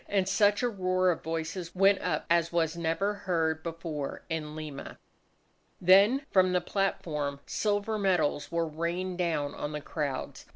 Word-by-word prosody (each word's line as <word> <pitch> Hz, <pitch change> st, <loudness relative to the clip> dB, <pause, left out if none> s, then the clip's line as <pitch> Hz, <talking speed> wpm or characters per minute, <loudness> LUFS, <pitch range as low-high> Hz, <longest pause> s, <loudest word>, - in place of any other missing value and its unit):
And 195 Hz, -2 st, +1 dB
such 205 Hz, +2 st, +3 dB
a -, -, +3 dB
roar 185 Hz, -4 st, +1 dB
of 170 Hz, -, -4 dB
voices 165 Hz, +2 st, -4 dB
went 195 Hz, +1 st, +4 dB
up -, -, -1 dB
as 170 Hz, 0 st, +2 dB
was 165 Hz, -1 st, +1 dB
never 170 Hz, +5 st, 0 dB
heard 165 Hz, -5 st, -1 dB
before 160 Hz, -3 st, -5 dB
in 155 Hz, -2 st, -3 dB
Lima. 155 Hz, -3 st, -7 dB, 0.8 s
Then 200 Hz, +10 st, +5 dB
from 185 Hz, -1 st, +4 dB
the 180 Hz, -, +3 dB
platform 155 Hz, -7 st, -2 dB
silver 210 Hz, +1 st, -1 dB
medals 180 Hz, -7 st, +1 dB
were 170 Hz, 0 st, +1 dB
rained 175 Hz, +4 st, -3 dB
down 155 Hz, -5 st, 0 dB
on 150 Hz, -, -5 dB
the 150 Hz, -, -3 dB
crowds. 145 Hz, -2 st, -4 dB
170 Hz, 155 wpm, -29 LUFS, 160-195 Hz, 0.8 s, Then